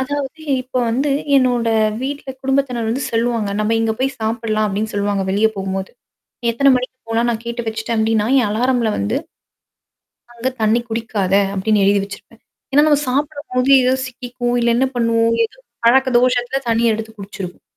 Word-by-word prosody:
அதாவது 285 +3 -4 0.2
இப்ப 255 0 -7
வந்து 275 +5 0 0.3
என்னோட 245 -3 +2 0.3
வீட்ல 280 0 -4
குடும்பத்தினர் 265 -3 0
வந்து 255 +4 -1
செல்லுவாங்க. 230 -2 0
நம்ம 220 +2 +1
இங்க 225 -1 +1
போய் 270 +1 -1
சாப்பில்லாம் 220 -1 -1
அப்டின்னு 210 +2 -2
சொல்லுவாங்க 200 -1 0
வெளிய 205 +3 +3
போகும்போது. 190 0 -3 0.6
எத்தனை 275 +4 +3
மணிக்கு 255 +1 -4
போலாம் 230 +1 +1
நான் 230 0 -3
கேட்டு 235 +1 -4
வச்சுட்டேன் 220 +1 -2
அப்டின்னா, 220 -1 +1
என் 225 -5 +2
அலாரம்ல 240 +1 +1
வந்து. 100 +1 -1 1.2
அங்க 240 +2 -2
தண்ணி 220 +2 +3
குடிக்காத 220 -4 -1 0.2
அப்டின்னு 205 +1 +1
எழுதி 200 0 +3
வச்சிருப்பேன். 205 +3 -12 0.3
ஏன்னா, 290 +2 +5
நம்ம 290 -1 +3
சாப்பிடும்போது 275 -1 -1
ஏதோ 255 +1 +3
சிக்கிக்கும், 245 -1 -4
இல்ல 235 0 +2
என்ன 260 +2 +3
பண்ணுவோம்? 230 -1 +2
ஏதோ - - -24 0.3
பழக்க 265 +3 +5
தோஷத்தில 250 +1 +1
தண்ணிய 230 0 +2
எடுத்து 220 0 -6
குடிச்சிருவோம். 195 -2 -8
235 Hz, 155 wpm, -19 LUFS, 220-255 Hz, 1.2 s, ஏன்னா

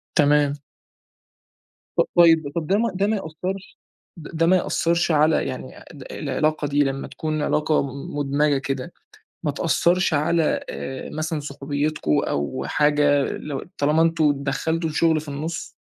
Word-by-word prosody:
تمام. 145 -2 +4 1.4
طب - - +4
طيب 165 -2 +6
ده 170 +4 +1
ما 230 +2 +1
ده 195 +2 +1
ما 220 - +1
يأثّرش 185 +3 -6 0.4
ده 160 +1 -2
ما 180 +3 +5
يأثرش 170 -1 +1
على 155 +1 +3
يعني 130 0 -7
آآ - - -14 0.3
العلاقة 150 +2 -1
دي 145 +1 +2
لمّا 135 0 -3
تكون 155 -1 -3
علاقة 150 +1 +1
مُدمجة 145 +1 0
كده، 135 +3 -4 0.5
ما 150 - 0
تأثرش 170 +4 +1
على 160 +2 +1
آآ 130 0 -6
مثلًا 155 0 -2
صحوبيتكم 145 - -1
أو 70 - -2
حاجة، 145 -1 +3
لو 145 -3 -5
طالما 150 +3 +2
إن 165 - +5
أنتم 150 -4 +1
دخلتوا 160 +3 -1
الشُّغل 160 0 +2
في 155 - -12
النُصّ؟ 155 +4 -4
150 Hz, 140 wpm, -23 LUFS, 145-165 Hz, 1.4 s, طيب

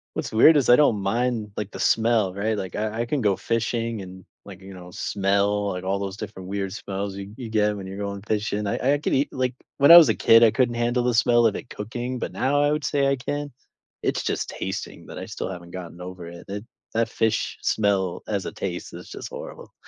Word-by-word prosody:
What's - - -3
weird 120 +9 +7
is, 140 -4 +2
I 120 - +8
don't 115 -9 +3
mind, 115 +1 -1
like, 105 -1 -4
the - - -8
smell, 110 -4 +2
right? 105 +2 -1
Like, 95 -3 -5
I 110 +2 -2
I - - -1
can 140 +4 -1
go 105 -5 +2
fishing, 115 -1 -2
and, 95 0 -10 0.2
like, 95 -2 -11
you 95 0 -11
know, 90 -1 -11
smell, 100 +2 0
like, 90 - -5
all 95 +1 -1
those 100 0 -4
different 100 -3 -8
weird 95 0 -3
smells 100 +1 -5
y 100 - -6
you 120 -3 -7
get 105 -1 +2
when 100 -2 -7
you're 95 +1 -7
going 100 -1 -4
fishing. 105 0 -2
I 130 +7 +1
I - - +2
could - - -1
eat 135 +2 +2
like, 130 -1 -1 0.2
when 140 +3 +6
I 170 - +13
was 170 - +9
a - - +2
kid, 115 0 +6
I 115 -2 +7
couldn't 120 +1 +1
handle 120 +1 +1
the 125 - +1
smell 120 0 +4
of 110 - +2
it - - -10
cooking, 120 +4 -5
but - - -4
now 145 +2 +1
I 145 - +3
would 150 -1 -1
say 140 -1 +2
I 140 - +1
can. 145 +3 -4 0.5
It's - - 0
just - - -2
tasting - - -5
that - - -8
I - - -6
still - - -5
haven't 85 -1 -9
gotten 90 -2 -8
over 90 -1 -8
it 85 0 -11
it 100 +1 -5 0.3
that 115 0 +1
fish 110 -2 0
smell, 100 -4 0
as 100 -3 -2
a - - -5
taste, 90 -2 -5
is - - -10
just - - -7
horrible. - - -9
105 Hz, 240 wpm, -24 LUFS, 95-120 Hz, 0.5 s, I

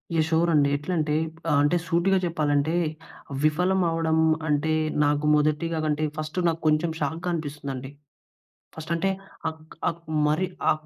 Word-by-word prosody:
Yeah! 160 - +4
Sure 165 +1 +2
అండి. 145 -2 +4
ఎట్లంటే, 150 0 -1 0.5
అంటే 145 +4 +3
సూటిగా 185 +3 +2
చెప్పాలంటే, 155 -1 +1 0.7
విఫలం 180 +5 +2
అవ్వడం 165 -1 +1 0.3
అంటే 150 +1 +1 0.3
నాకు 145 +1 +1
మొదటిగా 155 +2 +1
కంటే 155 0 0
ఫస్ట్ 155 +2 -5
నాకు 165 0 -1
కొంచెం 155 +2 +2
షాక్‌గా 160 +5 -2
అనిపిస్తుందండి. 140 -4 -5 0.9
ఫస్ట్ 160 +1 -7
అంటే 170 +4 0 0.4
అక్ 160 0 -13
అక్ 170 0 -7 0.3
మరి 155 +5 +1 0.2
ఆ - - +7
155 Hz, 135 wpm, -25 LUFS, 150-165 Hz, 0.9 s, ఆ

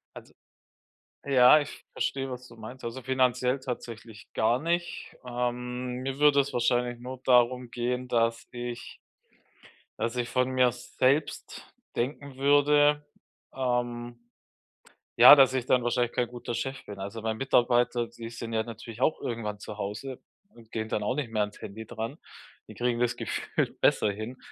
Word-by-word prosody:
Also - - -12 0.9
Ja, 135 +1 +7
ich 145 - -8
verstehe, 135 -1 -2
was 125 0 -7
du - - -14
meinst. 125 +4 -10
Also, 115 +3 -5
finanziell 130 0 +1
tatsächlich 115 -4 -7
gar 115 +3 +2
nicht. 170 +3 -2
Ähm, 125 0 -3
mir 135 +1 -4
würde 145 -1 +6
es 140 +1 -5
wahrscheinlich 120 0 +1
nur 130 +1 -7
darum 125 0 +3
gehen, 125 +1 -2
dass 115 -1 +1
ich 120 -1 -6 1.0
dass 115 +1 -1
ich 120 -1 -2
von 125 +1 +1
mir 130 -1 +3
selbst 130 +4 -1 0.3
denken 135 +2 -3
würde, 145 +1 +4 0.5
ähm, 120 -2 -2 1.0
ja, - - +11
dass 135 -2 +6
ich 130 -2 -1
dann 125 -1 +3
wahrscheinlich 120 0 0
kein 125 - 0
guter 120 0 -6
Chef 135 +3 -4
bin. 100 -1 -9
Also, 100 +4 -6
mein 110 0 -2
Mitarbeiter, 120 -2 +2
die 115 -1 -9
sind 115 0 -7
ja 110 0 +1
natürlich 115 +1 -9
auch 155 - +2
irgendwann 105 -3 -4
zu 105 0 -8
Hause 110 +6 -5 0.3
und 115 - -19
gehen 110 -1 -3
dann 105 - -1
auch 125 +5 0
nicht 140 -5 -2
mehr 110 -1 0
ans 105 0 -4
Handy 110 +2 -8
dran. 115 +7 -5 0.5
Die - - -10
kriegen 120 -1 -1
das 120 -1 +1
gefühlt - - -2
besser 105 - +4
hin. 110 +5 -7
125 Hz, 160 wpm, -28 LUFS, 115-130 Hz, 1.0 s, ja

